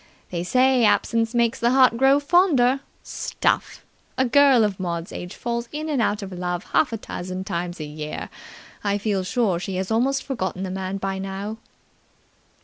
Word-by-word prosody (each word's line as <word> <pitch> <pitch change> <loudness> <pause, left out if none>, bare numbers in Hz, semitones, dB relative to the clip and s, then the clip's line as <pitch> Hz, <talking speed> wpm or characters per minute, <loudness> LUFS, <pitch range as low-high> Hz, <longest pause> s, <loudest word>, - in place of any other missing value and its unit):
They 170 -1 -2
say 255 +5 +3
absence 225 +2 +2
makes 235 +2 +2
the 235 - +2
heart 255 -2 +5
grow 270 +3 +4
fonder. 285 -5 +3 0.2
Stuff! - - -2 0.3
A 260 - +3
girl 270 -2 +5
of 205 -3 -1
Maud's 170 -2 -3
age 180 +2 -7
falls 235 0 -3
in 305 +1 -4
and 280 -5 +1
out 205 -1 0
of 195 - -7
love 180 0 -3
half 295 - +3
a 225 - -2
dozen 185 -2 -6
times 175 -2 -4
a - - -4
year. 150 0 -6 0.5
I 200 -1 +1
feel 205 -2 -1
sure 190 -2 0
she 185 +1 -4
has 190 +3 -3
almost 265 +5 +1
forgotten 190 -8 -3
the 185 - -4
man 190 +1 -3
by 195 0 -3
now." 195 +3 -5
210 Hz, 175 wpm, -23 LUFS, 185-255 Hz, 0.5 s, heart